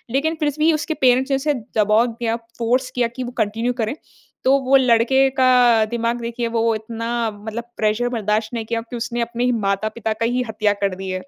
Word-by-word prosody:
लेकिन 315 +4 +1
फिर 300 -2 +1
भी 315 +2 +4
उसके 310 +1 -2
पेरेंट्स 260 +1 +4
ने - - +4
उसे 295 +2 0 0.2
दबाव 215 +3 +4
दिया 230 -1 -2 0.2
फ़ोर्स 250 +3 +1
किया 245 -2 +2
कि 255 - -4
वो 245 - -6
कंटिन्यू 225 +4 -2
करें। 220 +6 -2 0.5
तो 270 +1 +4
वो 265 +1 +3
लड़के 260 +2 +3
का 245 -3 +5
दिमाग 235 0 -1
देखिए 235 0 -3
वो 230 0 +1
इतना 230 +1 -5 0.2
मतलब 220 +3 -6
प्रेशर 215 +3 +1
बर्दाश्त 220 -1 -1
नहीं 230 -2 -3
किया 230 0 -2
कि 235 +1 -9
उसने 240 0 -3
अपने 235 +1 -2
ही 250 - +2
माता-पिता 215 +1 -1
का 230 +1 -2
ही 250 +2 0
हत्या 210 -1 +1
कर 195 -2 0
दि 190 0 -6
है। 185 0 -3
235 Hz, 210 wpm, -20 LUFS, 220-250 Hz, 0.5 s, का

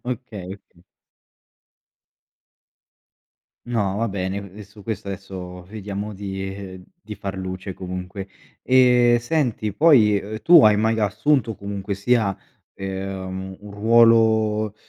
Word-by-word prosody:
Okay, 125 -6 -6
okay. 90 -3 -23 2.8
No, 105 -5 -1
va 115 +1 0
bene, 95 -1 -3
ehm, 100 +1 -10
su 105 +2 -15
questo 100 -2 -5
adesso, 95 -2 -7
vediamo 105 +1 -6
di 95 -1 -6 0.2
di 105 - -8
far 100 -1 -6
luce, 95 0 -5
comunque. 90 +1 -6 0.4
E, 125 -2 +5
senti, 120 -6 -1
poi, 110 -8 +5
uhm, 110 +2 -7
tu 175 -5 +8
hai 105 -1 +6
mai 110 +1 +1
assunto, 110 +3 +1
comunque 100 0 -5
sia, 100 -1 +1 0.4
ehm, 95 -1 -5
un 105 0 -11
ruolo, 110 -1 +3
100 Hz, 115 wpm, -22 LUFS, 95-110 Hz, 2.8 s, tu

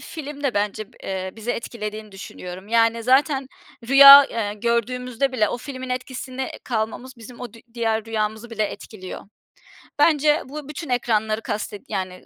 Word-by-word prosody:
film 295 -2 -8
de 270 -5 0
bence 210 +1 -2
b - - -23
eee, 190 -1 -4
bizi 225 +2 -4
etkilediğini 215 -3 -6
düşünüyorum. 185 0 -9
Yani, 230 0 +2
zaten 270 +2 +2 0.4
rüya, 280 +1 +11
eee, 210 -5 -3
gördüğümüzde 250 +3 -1
bile 215 -4 +2
o 240 - -4
filmin 260 0 -7
etkisine 255 +1 -5
kalmamız, 240 +2 -3
bizim 235 +2 -12
o 245 -4 -7
dü 230 - -14
diğer 225 -2 0
rüyamızı 220 +1 -3
bile 215 -1 -2
etkiliyor. 200 -2 -8 0.8
Bence 300 -1 +4
bu 290 +1 -8
bütün 300 0 -7
ekranları 220 -3 0
kasted 205 -1 -5
yani, 185 -1 -4
230 Hz, 150 wpm, -22 LUFS, 215-260 Hz, 0.8 s, rüya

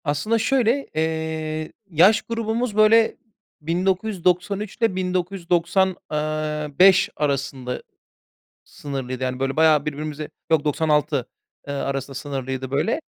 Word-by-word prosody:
Aslında 155 +10 0
şöyle, 255 +3 +1
eee, 160 0 -2 0.2
yaş 185 +6 +5
grubumuz 230 0 -2
böyle, 220 +1 +5 0.4
1993 185 +3 0
ile 230 -5 +1
1990, 180 0 0 0.2
eee, 150 0 -2
5 190 0 +6
arasında 140 -3 -2 0.8
sınırlıydı. 130 -3 -6
Yani 130 0 -2
böyle 135 0 -1
bayağı 155 -2 +4
birbirimize 150 0 -4 0.2
yok 160 -2 +3
96, 150 -3 +1 0.4
eee, - - -2
arasında 135 0 -3
sınırlıydı 135 -1 -4
böyle. 220 - 0
160 Hz, 105 wpm, -23 LUFS, 145-190 Hz, 0.8 s, 5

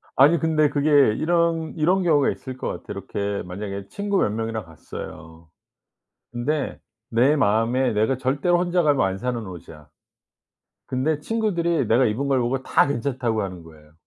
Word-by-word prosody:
아니 150 +5 +6
근데 155 -1 +2
그게 145 +1 0 0.2
이런 165 +1 0
이런 180 +4 +2
경우가 150 -5 +3
있을 130 -1 -6
것 - - -4
같아요. - - -5
이렇게 100 0 -3
만약에 100 +1 -6
친구 200 - -2
몇 - - +2
명이랑 110 0 -3
갔어요. 80 0 -10 0.8
근데 135 +4 -2 0.3
내 125 +6 +3
마음에 120 +1 +2
내가 110 +5 +1
절대로 140 +7 +1
혼자 175 0 +1
가면 145 -7 +3
안 95 0 -2
사는 120 0 -3
옷이야. 80 -4 -11 1.0
근데 145 +4 -1
친구들이 170 - 0
내가 120 +4 +4
입은 125 +7 -1
걸 135 -2 +2
보고 130 +2 -1
다 - - +3
괜찮다고 120 -4 -1
하는 90 -3 -6
거예요. 75 -2 -17
130 Hz, 335 characters per minute, -23 LUFS, 105-155 Hz, 1.0 s, 아니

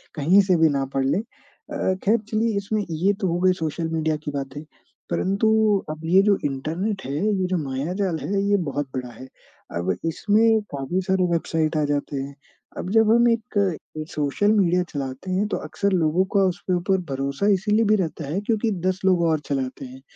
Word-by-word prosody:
कहीं 170 +7 +5
से 190 -2 +2
भी 160 - +6
ना 140 -2 0
पढ़ 135 - +1
लें। 140 +8 +1
अ, 210 -3 -5
ख़ैर 215 +4 +4
चलिए 220 0 0
इसमें 205 +1 -1
ये 170 +5 +1
तो 190 - +1
हो 175 - -1
गई 185 0 +4
सोशल 160 -1 -3
मीडिया 160 -1 0
की 145 - -2
बातें 140 +1 -5 0.5
परंतु, 200 +4 +1 0.4
अब 155 0 -6
ये 185 +4 +5
जो 200 -2 +3
इंटरनेट 165 +9 -2
है, 135 - -4 0.3
ये 185 - +1
जो 185 - 0
मायाजाल 160 +6 -2
है, 200 +4 -1
ये 205 0 +3
बहुत 140 0 -2
बड़ा 125 -1 -4
है। 130 +3 -11 0.5
अब 90 +2 0
इसमें 220 +6 +3
काफ़ी 140 +7 -2
सारे 190 -1 +2
वेबसाइट 160 -1 0
आ 150 - +2
जाते 145 0 -2
हैं, 140 +1 -5 0.4
अब 180 - -4
जब 220 0 +4
हम 235 +1 +5
एक 230 -1 -2 0.4
एक 155 +1 -5
सोशल 150 +8 +1
मीडिया 180 -3 +3
चलाते 135 +5 -5
हैं, 195 +3 +1
तो - - -2
अक्सर 200 0 -2
लोगों 170 +1 +2
का 195 - +5
उसके 180 +1 -3
ऊपर 190 +2 +1
भरोसा 140 +8 -1
इसलिए 210 +4 +2
भी 215 +1 +4
रहता 165 -5 -2
है, 160 +7 -1
क्योंकि 220 +1 0 0.2
10 185 0 -1
लोग 185 -2 +4
और 155 - +1
चलाते 135 -1 -3
हैं, 130 +1 -11
175 Hz, 195 wpm, -23 LUFS, 145-200 Hz, 0.5 s, भी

